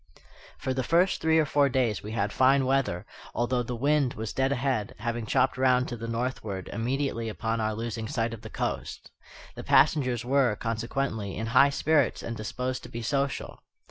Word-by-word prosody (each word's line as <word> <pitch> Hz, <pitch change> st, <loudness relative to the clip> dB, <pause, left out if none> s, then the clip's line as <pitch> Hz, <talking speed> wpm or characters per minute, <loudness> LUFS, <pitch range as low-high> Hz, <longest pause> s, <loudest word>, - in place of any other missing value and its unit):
For 130 Hz, -, -2 dB
the 130 Hz, -, -1 dB
first 170 Hz, +8 st, +2 dB
three 160 Hz, 0 st, +3 dB
or 160 Hz, -, +4 dB
four 145 Hz, -1 st, +3 dB
days 125 Hz, -5 st, 0 dB
we 105 Hz, +1 st, -7 dB
had 105 Hz, -2 st, -1 dB
fine 135 Hz, +1 st, +4 dB
weather, 130 Hz, -10 st, 0 dB, 0.3 s
although 120 Hz, +1 st, +1 dB
the 120 Hz, +1 st, -4 dB
wind 140 Hz, +1 st, +1 dB
was 110 Hz, -1 st, -5 dB
dead 135 Hz, +1 st, +1 dB
ahead, 130 Hz, -5 st, -1 dB
having 115 Hz, 0 st, -3 dB
chopped 130 Hz, -, +2 dB
round 130 Hz, -1 st, +3 dB
to 120 Hz, -, -4 dB
the 115 Hz, 0 st, -6 dB
northward 115 Hz, -5 st, -3 dB
immediately 115 Hz, 0 st, -1 dB
upon 110 Hz, +1 st, -2 dB
our 110 Hz, 0 st, -1 dB
losing 115 Hz, 0 st, -4 dB
sight 115 Hz, 0 st, -1 dB
of 115 Hz, -, -8 dB
the -, -, -9 dB
coast. -, -, -4 dB, 0.4 s
The -, -, -8 dB
passengers 125 Hz, -5 st, +3 dB
were, 130 Hz, -4 st, +3 dB
consequently, 115 Hz, -2 st, -3 dB
in 110 Hz, -, -2 dB
high 140 Hz, +2 st, +7 dB
spirits 145 Hz, -1 st, +1 dB
and 115 Hz, -, -4 dB
disposed 125 Hz, +4 st, -3 dB
to -, -, -10 dB
be 115 Hz, 0 st, -6 dB
social. 140 Hz, +2 st, -2 dB
125 Hz, 185 wpm, -27 LUFS, 115-135 Hz, 0.4 s, high